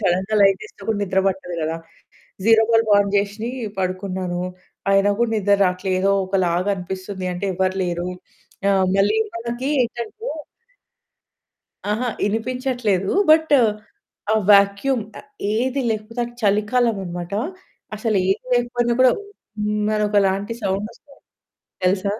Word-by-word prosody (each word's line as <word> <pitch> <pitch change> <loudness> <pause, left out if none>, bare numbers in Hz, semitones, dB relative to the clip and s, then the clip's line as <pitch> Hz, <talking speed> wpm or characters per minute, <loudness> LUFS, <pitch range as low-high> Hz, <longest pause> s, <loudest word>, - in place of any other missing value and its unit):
సడెన్‌గా 190 +2 0
లైట్ 195 -1 +4
వేస్తే 215 - -14
కూడా 220 -2 +1
నిద్ర 190 -1 0
పట్టదు 190 -2 -2
గదా! 160 +1 -1 0.7
జీరో 225 0 +6
బల్బ్ 225 -1 +3
ఆన్ 200 -1 +2
జేసి 205 +3 -1 0.3
పడుకున్నాను. 185 -1 -2 0.5
అయినా 195 +1 +4
గూడా 235 -1 +2
నిద్ర 205 -1 +3
రావట్లేదోకలాగా 185 0 +1
అనిపిస్తుంది. 185 +1 -6
అంటే 180 +3 -4
ఎవ్వరు 185 +1 0
లేరు. 175 0 -2 0.6
ఆహ్, 190 -1 +3
మళ్ళీ 205 +3 +3 0.2
మనకి 240 +3 -3
ఏంటంటే 235 -1 -4 1.8
అహా! 235 +4 0
వినిపించట్లేదు. 225 -3 0 0.2
బట్ 320 0 +5 0.8
ఆ - - +4 0.2
వాక్యూమ్ 200 +5 +4 0.5
ఏది 255 +5 0
లేకపోతే 220 +2 -3
అది 240 0 -10
చలికాలమన్నమాట. 205 -4 0 0.6
అసలేది 200 -4 +1 0.2
లేకపోయినా 240 0 +1
కూడా 255 -1 +7 0.5
హ్మ్ 210 0 0 0.2
ఒకలాంటి 200 0 +1
సౌండ్ 195 +1 -1
వస్తుంది. 280 -1 -20 0.7
తెలుసా? 190 +2 +1
200 Hz, 110 wpm, -21 LUFS, 190-225 Hz, 1.8 s, కూడా